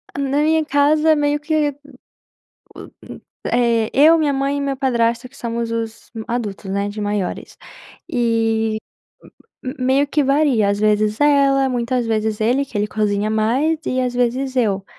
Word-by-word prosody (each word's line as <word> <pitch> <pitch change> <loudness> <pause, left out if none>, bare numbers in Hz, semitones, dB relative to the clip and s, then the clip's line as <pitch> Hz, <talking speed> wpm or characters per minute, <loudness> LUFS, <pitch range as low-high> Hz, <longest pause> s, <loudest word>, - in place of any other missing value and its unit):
Na 280 +1 0
minha 315 0 +2
casa, 300 +2 +3
meio 295 0 0
que 305 -1 0
hum - - -5
o 290 +1 -20
hum 285 - -16 1.6
é 235 -2 +2
eu 310 +5 +6
minha 295 -2 +1
mãe 275 +1 -1
e - - -2
meu 275 -1 -2
padrasto, 235 -2 0
que 275 - -19
somos 235 -1 -4
os 225 -1 -5 0.2
adultos, 215 -5 -4
né, 200 +1 -1
de 210 +1 -6
maiores. 205 -2 -4 0.5
E 225 -2 0 1.0
meio 265 +3 +2
que 290 0 +1
varia, 275 -7 +2
às 200 0 -1
vezes 215 0 +1
ela, 275 -2 +3
muitas 245 0 -1
vezes 220 -1 -1
ele, 250 +5 +2
que 235 - -7
ele 205 - +1
cozinha 210 -1 -1
mais 260 +9 +1
e 255 - 0
às 250 -1 -2
vezes 250 +2 -1
eu. 200 -5 0
245 Hz, 160 wpm, -19 LUFS, 220-280 Hz, 1.6 s, eu